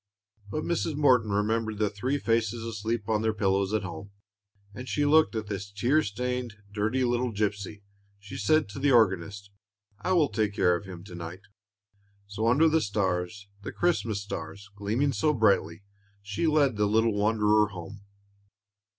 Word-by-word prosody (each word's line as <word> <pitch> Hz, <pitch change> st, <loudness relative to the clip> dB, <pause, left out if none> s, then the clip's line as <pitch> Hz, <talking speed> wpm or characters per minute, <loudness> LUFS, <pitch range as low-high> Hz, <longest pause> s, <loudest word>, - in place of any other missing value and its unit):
But 155 Hz, +8 st, -3 dB
Mrs. 165 Hz, -2 st, -1 dB
Morton 130 Hz, -7 st, +3 dB
remembered 110 Hz, +2 st, 0 dB
the 105 Hz, 0 st, +1 dB
three 125 Hz, +8 st, -1 dB
faces 115 Hz, -2 st, 0 dB
asleep 110 Hz, 0 st, -3 dB
on 110 Hz, -1 st, +1 dB
their 110 Hz, -1 st, 0 dB
pillows 100 Hz, -1 st, +1 dB
at 110 Hz, -3 st, 0 dB
home, 95 Hz, +2 st, -7 dB, 0.6 s
and 120 Hz, -, -8 dB
as -, -, -9 dB
she 145 Hz, -, +1 dB
looked 155 Hz, -3 st, +4 dB
at 110 Hz, -1 st, -2 dB
this 100 Hz, -1 st, -5 dB
tear 120 Hz, +10 st, +2 dB
stained, 125 Hz, 0 st, -3 dB, 0.2 s
dirty 110 Hz, +5 st, 0 dB
little 120 Hz, 0 st, 0 dB
gypsy, 105 Hz, -1 st, -3 dB, 0.3 s
she 100 Hz, +1 st, -11 dB
said 155 Hz, -1 st, +2 dB
to 100 Hz, -, -7 dB
the 140 Hz, +1 st, +2 dB
organist, 100 Hz, -3 st, +2 dB, 0.5 s
"I 185 Hz, -, 0 dB
will 160 Hz, -6 st, +3 dB
take 105 Hz, -2 st, -1 dB
care 90 Hz, -3 st, +3 dB
of 100 Hz, -, -6 dB
him 90 Hz, -2 st, -9 dB
to 95 Hz, -, -12 dB
night." 85 Hz, +2 st, -7 dB, 0.8 s
So, 105 Hz, +3 st, -2 dB
under 140 Hz, +8 st, +5 dB
the 160 Hz, 0 st, +3 dB
stars, 100 Hz, -2 st, -2 dB
the -, -, -6 dB
Christmas 115 Hz, -, 0 dB
stars, 100 Hz, +2 st, -7 dB
gleaming 115 Hz, +8 st, 0 dB
so 150 Hz, +1 st, +1 dB
brightly, 100 Hz, -5 st, +2 dB, 0.4 s
she 105 Hz, +11 st, -2 dB
led 145 Hz, -7 st, +3 dB
the 105 Hz, 0 st, +2 dB
little 110 Hz, +1 st, +2 dB
wanderer 105 Hz, 0 st, +3 dB
home. 95 Hz, +1 st, -9 dB
105 Hz, 170 wpm, -27 LUFS, 100-125 Hz, 0.8 s, under